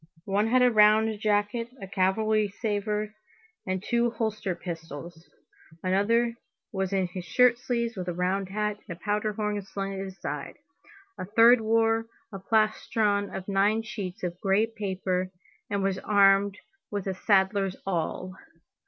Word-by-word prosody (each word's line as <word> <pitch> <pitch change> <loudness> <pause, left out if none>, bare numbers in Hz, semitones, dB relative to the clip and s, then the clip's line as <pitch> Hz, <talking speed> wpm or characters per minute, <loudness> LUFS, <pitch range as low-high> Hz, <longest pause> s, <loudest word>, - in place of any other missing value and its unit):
One 200 +2 +1
had 250 +2 +4
a 250 - +5
round 215 0 +4
jacket, 210 +2 0
a 195 - -6
cavalry 210 +3 +1
sabre, 210 0 -2 0.5
and 185 0 -2
two 235 +1 +1
holster 215 -5 -2
pistols, 165 -1 -8 0.5
another 225 +6 +2 0.4
was 190 -3 -2
in 190 -1 +1
his 180 0 -6
shirt 245 +4 +4
sleeves, 235 -1 -2
with 185 -2 -5
a 175 - -1
round 185 +2 -1
hat, 210 +1 -2
and 170 -4 -6
a - - -30
powder 210 0 -1
horn 210 -1 -2
slung 195 0 -5
at 195 - -5
his 190 -1 -9
side, 145 -3 -5 0.6
a - - -3
third 230 +4 +6
wore 225 0 +2 0.3
a 195 - -5
plastron 215 0 +1
of 190 -1 -7
nine 205 +3 +2
sheets 205 -2 -6
of 175 0 -4
gray 200 +1 +3
paper 190 -4 -2 0.4
and 200 -1 -1
was 195 -1 0
armed 200 -1 +4 0.3
with 205 -2 -3
a 190 - -1
saddler's 195 0 +2
awl. 185 0 -2
205 Hz, 155 wpm, -27 LUFS, 190-220 Hz, 0.6 s, third